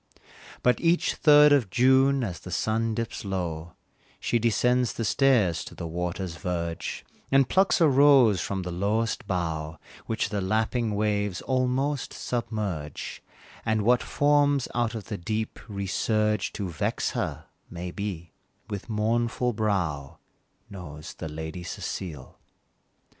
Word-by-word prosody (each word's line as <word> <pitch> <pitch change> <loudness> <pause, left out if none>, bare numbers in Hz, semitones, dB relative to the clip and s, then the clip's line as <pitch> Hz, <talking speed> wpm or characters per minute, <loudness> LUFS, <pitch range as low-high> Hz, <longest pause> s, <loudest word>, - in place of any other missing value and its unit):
But 125 - +3
each 170 +1 +2
third 150 -1 +6
of 130 -8 +2
June 130 +4 +4
as 90 -8 -4
the - - -10
sun 110 0 0
dips 115 -1 -4
low, 85 -4 -4 0.5
She 120 - +1
descends 125 +2 +2
the 115 - -3
stairs 100 - +3
to - - -10
the 85 - -6
water's 85 +1 -4
verge, 85 -1 -4 0.3
And 135 -1 +5
plucks 190 +1 +3
a 165 - +6
rose 135 - +5
from 95 -2 -3
the 90 - -4
lowest 105 +4 -1
bough 80 -4 -2 0.3
Which 110 -1 -1
the 105 -2 -2
lapping 110 +3 0
waves 105 -3 -1
almost 130 +2 0
submerge, 105 - -4 0.4
And 110 -2 +1
what 120 +3 +4
forms 145 -2 +2
out 120 -1 0
of 110 - -5
the 105 -3 -5
deep, 110 +5 -3
resurge 105 +2 0
To 100 - -3
vex 80 -4 -1
her, - - -3 0.2
maybe, 90 -1 -5 0.4
with 100 +2 -5
mournful 115 +3 0
brow, 90 -10 -1 0.5
Knows 85 -3 -9
the 80 - -6
Lady 80 +3 -6
Cecile. 85 -4 -6
105 Hz, 130 wpm, -26 LUFS, 90-125 Hz, 0.5 s, third